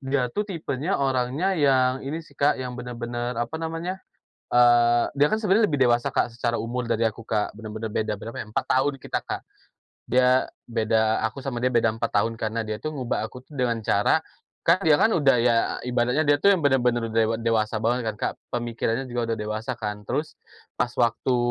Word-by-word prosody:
dia 135 -2 -1
tuh 210 0 -2
tipenya 165 -1 -2
orangnya 135 +7 0
yang 130 -5 +3
ini 155 +4 -5
sih, 145 - -19
Kak, 140 +1 +2
yang 125 -1 -5
benar-benar, 120 -1 -4
apa 120 +8 -3
namanya, 165 +4 -4 0.5
eee, 120 -1 +4
dia 145 +1 +3
kan 215 - +1
sebenarnya 215 0 +3
lebih 145 - 0
dewasa, 120 +2 +2
Kak, 125 -2 0
secara 120 0 -1
umur 120 +1 -3
dari 115 0 +1
aku, 110 0 -1
Kak. 110 -2 -1
Benar-benar 110 0 -6
beda 110 0 -1
berapa 115 +3 -7
ya? - - -6
4 105 - -2
tahun 135 +2 +1
kita, 130 - -3
Kak. - - -5 0.7
Dia, 125 +1 +3 0.2
beda 110 -1 +1
aku 110 +5 -2
sama 130 -3 -4
dia 130 - +2
beda 115 -2 +2
4 115 - -2
tahun 110 +2 +1
karena 110 0 -3
dia 110 0 -5
itu 155 - -2
ngubah 130 -7 -2
aku 125 0 -12
tuh 150 - -15
dengan 125 -4 0
cara, 100 +9 +3 0.5
kan 170 - +6
dia 155 - +5
kan - - +5
udah 135 -5 +4
ya 120 0 +3 0.3
ibaratnya 125 +3 +1
dia 145 0 +5
tuh 200 - +7
yang 185 - +1
benar-benar 125 -5 +2
dewa 115 0 +2
dewasa 110 -1 0
banget 115 +1 0
kan, 105 - -10
Kak. - - -1 0.2
Pemikirannya 120 +1 -2
juga 120 -2 -2
udah 115 - -1
dewasa, 110 +3 -4
kan. 105 -2 -4
Terus, 145 +8 -3 0.4
pas 125 0 -1
waktu 120 +2 +2
120 Hz, 200 wpm, -25 LUFS, 115-140 Hz, 0.7 s, tuh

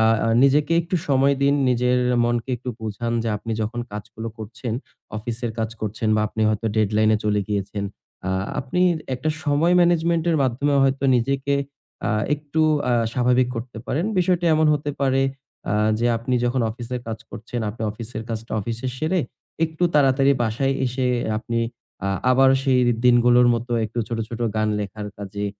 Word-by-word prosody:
আ - - +4 0.2
আ - - +2
নিজেকে 145 +3 +3
একটু 175 +2 -2
সময় 140 0 +4
দিন 140 +1 +4
নিজের 125 0 +2 0.3
মনকে 120 +1 -1
একটু 125 +2 -8
বোঝান 110 +2 -3
যে 115 - -2
আপনি 115 +2 -5
যখন 120 +3 -3
কাজগুলো 110 +2 -6
করছেন 110 +2 -6 0.4
অফিসের 115 +2 -4
কাজ 110 -1 -1
করছেন 110 +1 -2
বা - - +2
আপনি 110 +1 -2
হয়তো 110 +1 -1
ডেডলাইনে 110 0 +3
চলে 105 -1 +2
গিয়েছেন। 100 0 -2 0.4
আ 95 - 0 0.3
আপনি 135 +7 -2 0.3
একটা 130 +5 -3 0.2
সময় 155 +4 +3
ম্যানেজমেন্টের 170 -1 +2
মাধ্যমে 135 +3 +1
হয়তো 135 0 +1
নিজেকে 135 +3 0 0.5
আ - - +1 0.2
একটু 150 +1 -3 0.3
আ - - +3 0.2
স্বাভাবিক 125 0 +2
করতে 115 0 -6
পারেন। 165 +6 -1
বিষয়টি 180 -1 +2
এমন 155 0 +3
হতে 145 0 -2
পারে 135 -1 +2 0.5
আ - - +1 0.3
যে 120 - +1
আপনি 120 +3 -2
যখন 120 +1 +1
অফিসের 120 +2 -5
কাজ 110 0 -4
করছেন, 115 +2 -6
আপনি 110 +2 -8
অফিসের 110 +1 -7
কাজটা 115 0 -5
অফিসে 115 +4 -4
সেরে 165 +5 +1 0.4
একটু 160 +1 -6
তাড়াতাড়ি 135 -1 +4
বাসায় 125 +5 0
এসে 125 +1 -1 0.3
আপনি 115 +1 -3 0.5
আ - - 0 0.2
আবার 130 +1 +5
সেই 130 -2 +3 0.2
দিনগুলোর 120 0 +5
মতো 120 +1 -4
একটু 110 +3 -5
ছোট, 115 -1 -3
ছোট 120 -1 -7 0.2
গান 110 0 +1
লেখার 105 +1 -5
কাজে 100 0 -4
120 Hz, 165 wpm, -23 LUFS, 110-140 Hz, 0.5 s, আবার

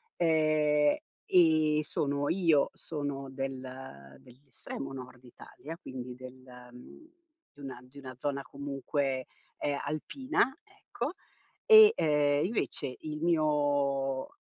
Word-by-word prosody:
ehm, 155 -2 +3 0.4
e 155 -3 +5
sono 145 -1 -1
io 165 -6 +3
sono 145 -3 -5
del 135 -1 -4 0.6
dell'estremo 135 - -9
nord 130 -1 -10
Italia, 155 +6 -11
quindi 125 -5 -8
del 130 0 -11 1.1
di 145 - -22
una 135 -3 -7
di 130 +3 -18
una 130 -2 -9
zona, 140 +1 -2
comunque, 140 -1 -3 0.3
ehm, 145 -1 -1
alpina, 260 - -1
ecco. 405 -3 -6 0.5
E, 435 -1 +9
uhm, 150 -1 +2
invece 190 - -3
il 150 -1 -6
mio 145 -4 +1
145 Hz, 105 wpm, -30 LUFS, 135-155 Hz, 1.1 s, E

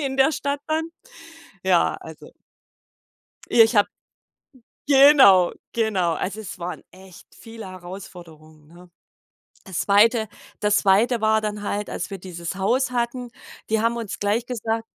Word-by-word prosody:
in 270 -2 -3
der 270 +2 +4
Stadt 280 -1 -3
dann. 320 +1 -1 0.8
Ja, 185 -2 +2
also 160 -1 -12 1.2
Ja 230 - +7
ich 225 +2 0
habe 205 - +4 1.0
genau, 270 -10 +7 0.2
genau. 200 -7 0
Also 195 +6 -4
es 200 -4 -8
waren 175 +1 -6
echt 185 -1 -16
viele 225 -2 -11
Herausforderungen, 175 -4 -12
ne? 175 +2 -17 0.7
Das 190 -3 -4
2. 220 +3 +3 0.3
das 210 0 +2
2. 215 +4 +2
war 220 0 +3
dann 210 -1 -4
halt, 205 0 -3
als 180 - -5
wir 195 - -6
dieses 175 -1 -7
Haus 245 +8 0
hatten, 245 0 -3 0.4
die 220 0 +1
haben 230 +1 +1
uns 225 -4 -5
gleich 210 +4 -1
gesagt 225 -2 -3
210 Hz, 140 wpm, -22 LUFS, 185-235 Hz, 1.2 s, Ja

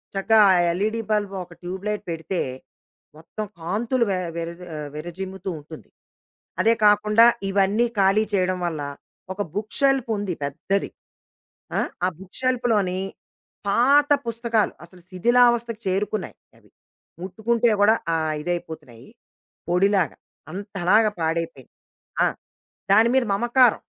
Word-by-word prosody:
చక్కగా 220 +3 +3
ఆ - - +6 0.2
LED 215 +6 -1
bulb 205 -2 0
ఒక 175 - -15
ట్యూబ్ 185 +2 -6
లైట్ 210 -1 -2
పెడితే, 165 +3 -3 0.8
మొత్తం 210 +6 -7
కాంతులు 225 +9 0
వె 185 - 0 0.2
వెర 165 0 -3
జ - - -14
ఆహ్, 150 -1 -5
వేరజిమ్ముతూ 190 +4 -6
ఉంటుంది. 155 +2 -12 0.7
అదే 230 - +4
కాకుండా 210 +2 +5 0.2
ఇవన్నీ 200 +4 +2
ఖాళీ 195 +3 +4
చేయడం 185 -1 +1
వల్ల 155 -3 -4 0.5
ఒక 205 - -5
బుక్ 210 0 -4
షెల్ఫ్ 270 -3 +2
ఉంది 200 -3 -2
పెద్దది. 190 +8 -2 0.9
ఆ! - - +2 0.3
ఆ - - +3
బుక్ 190 -1 -11
షెల్ఫ్‌లోని 230 -8 +1 0.7
పాత 280 +7 +4 0.2
పుస్తకాలు 230 -1 0
అసలు 180 +1 -16
శిథిలావస్థకు 235 +3 +2
చేరుకున్నాయి 200 +1 -2 0.2
అవి. - - -24 0.5
ముట్టుకుంటే 230 +4 0
కూడా 220 +2 +6 0.2
ఆహ్, 155 -1 0
ఇదైపోతున్నాయి 160 -8 -6 0.6
పొడిలాగా 190 0 +2 0.3
అంతలాగా 200 +2 +1
పాడైపోయినాయి. 160 -5 -3 0.5
ఆ! - - +4 0.7
దాని 225 +3 +5
మీద 260 - +4
మమకారం. 240 +2 +3
200 Hz, 120 wpm, -23 LUFS, 180-230 Hz, 0.9 s, ఆ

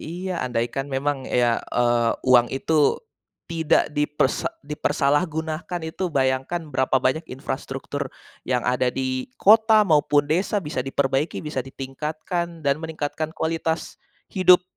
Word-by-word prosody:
Iya. 180 +2 -4
Andaikan 120 +2 -2
memang 135 0 -1
ya, 120 -2 +2
eee, 120 -1 +2
uang 120 -2 +6
itu 150 +2 +2 0.5
tidak 165 -2 +2
dipersa 150 -2 0 0.2
dipersalahgunakan 155 +4 -1
itu, 160 +4 -3
bayangkan, 135 +5 0
berapa 130 0 +1
banyak 155 +6 +1
infrastruktur 135 +1 -5 0.4
yang 125 -1 +1
ada 125 0 +1
di 130 -1 -2
kota 220 +1 +6
maupun 150 -5 +3
desa 190 +5 +1
bisa 150 -4 -3
diperbaiki, 135 +2 0
bisa 150 -3 -4
ditingkatkan, 155 +6 -4
dan 140 0 +1
meningkatkan 155 0 -4
kualitas 160 0 -2 0.3
hidup 185 -2 +6
150 Hz, 120 wpm, -23 LUFS, 130-160 Hz, 0.5 s, uang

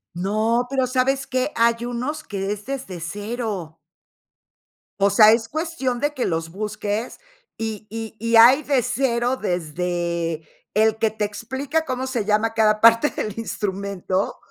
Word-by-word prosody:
No, 215 +6 +1
pero, 265 -1 +1
¿sabes 265 +1 +1
qué? 255 +3 -1
Hay 230 0 +2
unos, 255 +6 -3
que 200 -7 -3
es 210 0 -5
desde 260 -10 -5
0. 205 -2 -5 1.2
O 200 - +5
sea, 215 +2 +7
es 225 0 +2
cuestión 305 -6 -2
de 290 0 0
que 260 -4 -2
los 165 -1 -2
busques, 210 +3 -4 0.4
y 220 -2 -5
y 225 0 -6
y 230 +1 +1
hay 245 +6 +8
de 275 -3 +2
0, 245 0 0
desde 170 -3 -2 0.3
el 220 +1 +3
que 220 - +2
te 215 0 -4
explica 265 +9 -2
cómo 260 -1 -2
se 250 -5 -2
llama 215 +2 +1
cada 215 -1 +3
parte 230 +5 +6
del 215 - -4
instrumento, 200 -3 -2
225 Hz, 150 wpm, -22 LUFS, 200-255 Hz, 1.2 s, hay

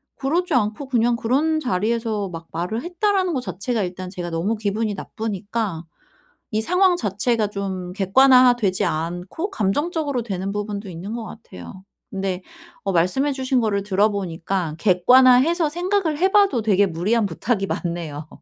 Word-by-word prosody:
그러지 335 +5 -1
않고 225 +4 0
그냥 240 -2 +2
그런 290 +8 +1
자리에서 225 -3 -1
막 165 -1 -8
말을 180 +8 -3
했다라는 370 +1 0
거 - - 0
자체가 230 0 -2
일단 185 0 -5
제가 175 -2 -5
너무 175 +7 -1
기분이 210 0 -1
나쁘니까 205 -4 -4 0.7
이 215 - +1
상황 360 - +3
자체가 220 - 0
좀 190 -3 -5
객관화되지 245 0 +4
않고 175 - -3
감정적으로 290 - -1
되는 195 -2 -3
부분도 205 0 -4
있는 180 +6 -6
것 235 -1 -5
같아요. 205 -4 -11 0.3
근데 190 -1 -3 0.4
어 195 - 0
말씀해 185 +12 +2
주신 260 -1 0
거를 205 -3 0
들어보니까 190 -4 -1
객관화해서 255 - +5
생각을 350 -1 0
해 380 +3 +2
봐도 400 - +4
되게 205 -2 +3
무리한 200 +7 0
부탁이 195 +3 -1
맞네요. 165 -5 -4
215 Hz, 340 characters per minute, -22 LUFS, 185-260 Hz, 0.7 s, 객관화해서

